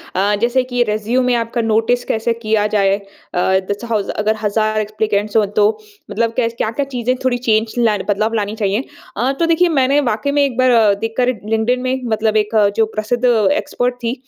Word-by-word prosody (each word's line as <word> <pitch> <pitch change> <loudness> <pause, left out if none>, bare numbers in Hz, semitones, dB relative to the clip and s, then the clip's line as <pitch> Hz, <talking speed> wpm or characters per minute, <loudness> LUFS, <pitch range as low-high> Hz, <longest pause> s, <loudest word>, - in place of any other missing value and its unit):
अ, 200 +3 +2
जैसे 245 +2 +2
कि 245 -1 -2
रिज्यूमे 240 +4 0
आपका 235 +1 -1
नोटिस 225 +2 +1
कैसे 225 +1 0
किया 220 -2 0
जाए? 200 -2 +2
अ, 200 - -16 0.6
जैसे 205 +4 -4
हाउ 220 -3 0
ज - - -10
अगर 215 +1 +1
हज़ार 215 +1 0
एप्लीकेंट्स 215 0 -1
हो 215 - +4
तो 205 -1 +5 0.4
मतलब 230 +1 0
कैस 230 -2 0
क्या-क्या 235 +6 -1
चीज़ें 245 +1 0
थोड़ी 250 -1 +2
चेंज 225 -2 0
ल 225 -3 +2
बदलाव 215 +2 0
लानी 210 -1 -2
चाहिए। 210 +2 -1 0.3
अ, 245 +5 +1
तो 335 - +3
देखिए 335 +2 +3
मैंने 275 -2 +2
वाक़ई 225 +5 -1
में 285 0 +2
एक 255 -4 -4
बार 235 -5 +4
देख 225 0 -3
कर 250 -1 +2 0.2
लिंक्डइन 225 +3 +1
में 260 +1 -2
मतलब 220 0 +1
एक 215 +1 -1 0.2
जो 225 - +3
प्रसिद्ध 225 +3 -2
एक्सपर्ट 240 +2 +1
थी 230 +1 0
225 Hz, 195 wpm, -17 LUFS, 215-245 Hz, 0.6 s, तो